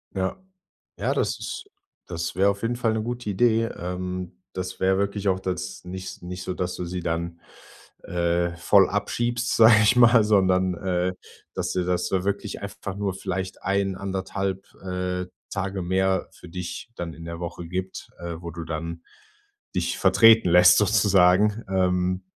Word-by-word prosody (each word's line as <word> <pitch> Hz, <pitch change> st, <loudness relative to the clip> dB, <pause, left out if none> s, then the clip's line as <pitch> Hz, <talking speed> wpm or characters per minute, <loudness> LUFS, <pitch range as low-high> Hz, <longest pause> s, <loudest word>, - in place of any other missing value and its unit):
Ja. 95 Hz, 0 st, -1 dB, 0.6 s
Ja, -, -, 0 dB
das -, -, 0 dB
ist 440 Hz, -3 st, -6 dB, 0.4 s
das 85 Hz, -1 st, -4 dB
wäre 95 Hz, +2 st, +4 dB
auf 100 Hz, 0 st, -5 dB
jeden 120 Hz, +1 st, 0 dB
Fall 115 Hz, -2 st, +1 dB
'ne 110 Hz, -, -1 dB
gute 120 Hz, 0 st, -4 dB
Idee. 115 Hz, +2 st, +3 dB
Ähm, 90 Hz, -1 st, -5 dB
das 95 Hz, 0 st, -5 dB
wäre 95 Hz, 0 st, +3 dB
wirklich 100 Hz, 0 st, -1 dB
auch 95 Hz, -1 st, +1 dB
das 95 Hz, 0 st, -4 dB
nich 95 Hz, +1 st, -7 dB
nicht 90 Hz, +1 st, -6 dB
so, 90 Hz, -, -4 dB
dass 90 Hz, 0 st, -3 dB
du 90 Hz, -, -4 dB
sie 90 Hz, +1 st, -4 dB
dann, 85 Hz, +1 st, -3 dB, 0.6 s
äh, 85 Hz, 0 st, 0 dB
voll 95 Hz, +3 st, +5 dB
abschiebst, 120 Hz, +4 st, -1 dB
sag 110 Hz, -1 st, +7 dB
ich 110 Hz, +3 st, +5 dB
mal, 120 Hz, -2 st, +7 dB
sondern, 95 Hz, -3 st, +3 dB
äh, 90 Hz, 0 st, -1 dB, 0.4 s
dass -, -, -2 dB
dir 90 Hz, -, 0 dB
das 90 Hz, 0 st, -1 dB
wirklich 100 Hz, +2 st, -2 dB
einfach 100 Hz, -1 st, -6 dB
nur 100 Hz, -1 st, -1 dB
vielleicht 95 Hz, 0 st, -4 dB
1 100 Hz, 0 st, 0 dB
1/2,, 95 Hz, 0 st, -3 dB, 0.2 s
äh, 90 Hz, -1 st, -3 dB, 0.2 s
Tage 95 Hz, -1 st, -3 dB
mehr 95 Hz, +1 st, +1 dB
für 90 Hz, -, -14 dB
dich 90 Hz, +6 st, -6 dB
dann 85 Hz, -1 st, -5 dB
in 85 Hz, -, -11 dB
der 85 Hz, 0 st, -6 dB
Woche 85 Hz, 0 st, -6 dB
gibt, 95 Hz, +2 st, -5 dB
äh, 85 Hz, -1 st, -5 dB
wo 85 Hz, -1 st, -6 dB
du 85 Hz, 0 st, -6 dB
dann 85 Hz, +1 st, -5 dB, 0.7 s
dich -, -, -1 dB
vertreten 115 Hz, -3 st, +6 dB
lässt, 90 Hz, +1 st, +7 dB
sozusagen, 105 Hz, 0 st, +4 dB
ähm. 90 Hz, 0 st, +1 dB
95 Hz, 165 wpm, -25 LUFS, 90-100 Hz, 0.7 s, sag